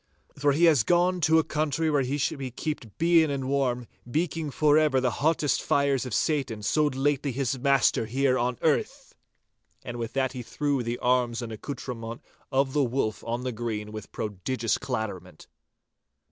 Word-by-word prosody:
For 145 0 +2
he 160 +5 +1
has 160 -7 +6
gone 175 - +2
to 160 +1 +4
a 160 - +4
country 155 +1 0
where 145 -2 +3
he 135 +2 -1
shall 140 0 -1
be 135 -2 -4
keeped 125 -4 -5
bien 165 -1 +4
and 135 -2 -2
warm, 130 -3 0 0.2
beiking 155 +1 -1
forever 150 -1 +3
foment - - +3
the 125 - +2
hottest 155 -1 +2
fires 140 -2 +1
of 120 - -3
Satan, 135 -9 -1
so 150 +7 +2
lately 140 0 0
his 130 0 -2
master 135 -4 +3
here 130 +2 +2
on 125 -1 0
earth!' - - 0 0.7
And 120 0 -6
with 115 -1 -4
that 135 -1 0
he 130 -2 -6
threw 140 +2 -1
the 120 0 -3
arms 125 -1 +1
and 115 - -6
accoutrement 115 -1 -6 0.3
of 135 0 +1
the 145 - +3
Wolf 115 -4 -1
on 120 +2 -3
the 130 - -2
green 110 -2 -4
with 110 -1 -8
prodigious 110 +3 -2
clatterment. 105 -5 -5
135 Hz, 175 wpm, -27 LUFS, 120-145 Hz, 0.7 s, has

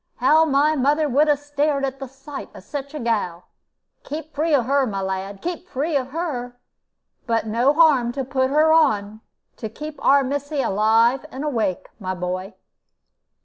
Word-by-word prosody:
How 305 +6 +4
my 295 +1 +2
mother 295 +3 +2
would 290 +3 +3
'a 295 - +4
stared 290 0 -1
at 270 0 -5
the 270 - -6
sight 270 +2 -9
of - - -11
such 280 +1 -6
a - - -4
gal! 205 -8 -1 0.6
Keep 310 +1 -7
free 315 +3 0
of 270 -6 +3
her, 275 0 +2
my 200 -3 -3
lad, 190 +1 -4
keep 355 +1 -4
free 295 +4 -2
of 260 -2 0
her. 260 -5 -4 0.7
But 230 -1 +1
no 235 +5 +2
harm 295 -6 +4
to 270 +1 -2
put 260 0 0
her 310 +3 +4
on, 215 -9 +2 0.4
to 220 - -5
keep 300 +7 -8
our 280 0 +5
missy 285 +2 -3
alive 230 +5 +2
and 265 +3 -6
awake, 225 -11 -1
my 185 -2 -3
boy." 185 +2 -4
270 Hz, 175 wpm, -22 LUFS, 225-295 Hz, 0.7 s, our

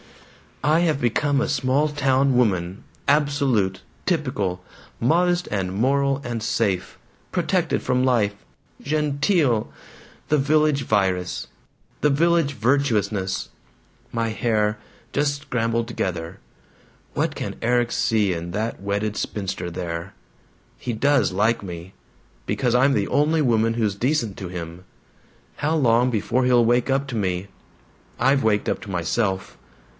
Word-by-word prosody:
"I 155 +4 +4
have 160 -5 +1
become 140 +4 +1
a - - 0
small 135 +4 +2
town 135 -2 +2
woman. 95 -6 +1 0.2
Absolute. 140 -9 +2 0.3
Typical. 125 - -1 0.4
Modest 175 +7 +2
and 95 -3 -1
moral 135 +5 +1
and 120 -2 -3
safe. 95 -4 -1 0.3
Protected - - 0
from 125 0 +1
life. 115 -6 +2 0.5
GENTEEL! 145 - +1 0.6
The 150 - +4
Village 150 0 +2
Virus 95 -5 0 0.5
the 150 - +4
village 165 0 +2
virtuousness. 110 -6 0 0.6
My 115 -1 -1
hair 105 -1 0 0.3
just 145 0 0
scrambled 115 -4 -1
together. 90 -5 -4 0.7
What - - 0
can - - -4
Erik 120 0 +1
see 110 -5 +1
in 85 0 -5
that 110 +3 -3
wedded 100 +1 -1
spinster 95 -3 -3
there? 85 +1 -5 0.6
He 120 - -4
does 140 +2 +2
like 105 +5 +1
me! 90 -1 -8 0.5
Because 125 -3 0
I'm 135 +3 +4
the - - +1
only 155 +2 +2
woman 115 -4 +2
who's 110 -4 0
decent 120 -3 0
to 95 - -5
him! 85 0 -7 0.7
How 155 +3 0
long 125 -4 +3
before 120 +2 0
he'll 120 -2 +4
wake 120 +3 +2
up 135 +1 +1
to 125 - -4
me?... 95 -3 -1 0.7
I've 135 +3 +3
waked 105 -2 +1
up - - -2
to - - -9
myself. 95 +2 -1
120 Hz, 130 wpm, -23 LUFS, 100-140 Hz, 0.7 s, I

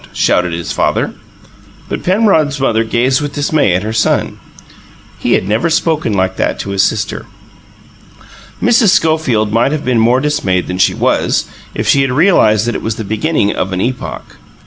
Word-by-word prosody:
shouted 90 -1 +1
his 85 0 -4
father. - - -1 0.7
But - - -4
Penrod's 180 -8 +2
mother 115 -4 +1
gazed 125 +4 +1
with 145 -1 -5
dismay 145 - +1
at 95 - -1
her 110 +1 -4
son: 110 - 0 0.8
he - - 0
had 95 - 0
never 110 +9 +1
before 165 0 +2
spoken 155 - -1
like 95 -1 -1
that - - -1
to 100 - -6
his 100 -1 +1
sister. 105 +1 -2 1.3
Mrs. 230 -3 +3
Schofield 155 - +1
might 115 +5 +2
have 155 -1 -3
been 125 -2 +1
more 120 +3 +3
dismayed 95 -11 -1
than 90 0 -5
she - - +3
was, - - 0 0.3
if - - -3
she 140 - +4
had 135 -1 0
realized 125 - +3
that 120 - -1
it - - -4
was 110 -1 -3
the 110 - -5
beginning 110 +1 0
of 95 +1 -3
an 90 - -2
epoch. 125 +5 -5
120 Hz, 180 wpm, -14 LUFS, 105-150 Hz, 1.3 s, she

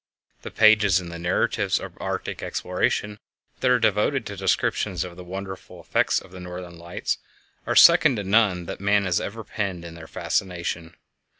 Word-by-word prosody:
The - - -7
pages 105 -4 +5
in 90 -2 -8
the 85 0 -7
narratives 90 +2 +1
of - - -9
Arctic - - -4
exploration 105 0 -1 0.4
that 130 - +2
are 125 - +5
devoted 115 +3 +1
to 100 - -6
descriptions 95 -1 0
of 90 -2 -8
the 90 - -10
wonderful 95 +1 -8
effects - - +1
of - - -16
the 95 - -10
Northern 90 -1 -8
Lights 85 +1 -3 0.5
are - - 0
second 130 - +7
to 105 - -3
none 100 -3 +2
that - - -7
man 100 0 +2
has 90 -2 +1
ever 110 +2 -6
penned 95 -4 -4
in 85 - -8
their 80 -1 -11
fascination. 85 -2 -3
95 Hz, 175 wpm, -24 LUFS, 85-105 Hz, 0.5 s, second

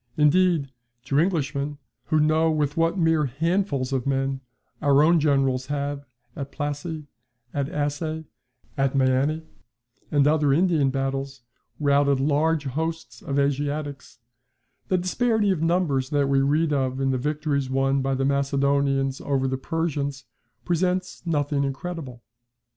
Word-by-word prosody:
Indeed, 155 -1 +3 0.3
to 140 +2 +1
Englishmen, 150 -4 0 0.3
who 155 - +2
know 155 +2 +3
with 150 -2 0
what 165 +3 +1
mere 160 -3 +3
handfuls 145 -1 -1
of 130 -1 -1
men 135 0 0 0.4
our 140 0 +4
own 170 +2 +5
generals 135 -3 +1
have, 140 -1 -3 0.3
at 140 0 -6
Plassy, 145 +2 -4 0.5
at 140 -1 -1
Assaye, 155 +2 -2 0.5
at 135 -1 0
Meeanee, 135 +4 +2 0.7
and 145 -2 +3
other 150 -2 +3
Indian 160 -4 +3
battles, 135 0 -3 0.4
routed 140 -1 +3
large 150 +2 +1
hosts 145 -3 -4
of 140 - -3
Asiatics, 145 +1 -2 0.7
the 185 - +2
disparity 210 +3 +1
of 175 -5 -1
numbers 165 -6 +1
that 145 -1 +1
we 135 0 +3
read 150 +3 +2
of 130 -2 0
in 135 0 +1
the 130 - 0
victories 145 -1 -1
won 135 +1 +1
by 135 0 0
the 135 +1 0
Macedonians 140 -1 +1
over 135 -2 0
the 130 - -1
Persians 140 -1 -3 0.4
presents 180 +1 -1
nothing 145 -3 0
incredible. 135 -3 -5
145 Hz, 135 wpm, -24 LUFS, 135-160 Hz, 0.7 s, own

